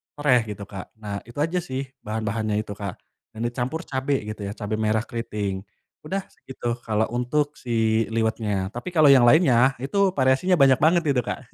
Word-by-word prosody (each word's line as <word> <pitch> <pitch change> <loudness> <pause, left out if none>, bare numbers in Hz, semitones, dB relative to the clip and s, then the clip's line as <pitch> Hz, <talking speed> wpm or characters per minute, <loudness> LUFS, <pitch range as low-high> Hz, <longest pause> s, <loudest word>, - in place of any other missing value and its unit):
sereh 145 -4 +3
gitu 100 - -8
Kak 95 -2 -9
nah 105 -2 -5
itu 120 - -13
aja 170 +3 0
sih 135 -6 -4 0.2
bahan-bahannya 110 0 -2
itu 105 - -9
Kak, 100 -2 -5 0.4
dan 110 - -4
dicampur 125 +8 -2
cabe 135 -2 -1
gitu 105 0 -7
ya 100 - -6
cabe 105 0 -3
merah 110 0 +1
keriting, 105 -5 -4 0.4
udah 195 +5 -2
segitu 120 -2 -5
kalo 110 0 +2
untuk 145 +5 -1
si 115 -2 +1
liwetnya 110 -4 0
tapi 125 +10 -6
kalo 155 -3 +6
yang 130 -3 +7
lainnya 130 -3 +5
itu 190 +7 +1
variasinya 130 +8 +3
banyak 135 -5 +5
banget 170 +2 +4
gitu 135 -3 +3
Kak - - -3
120 Hz, 175 wpm, -24 LUFS, 110-140 Hz, 0.4 s, yang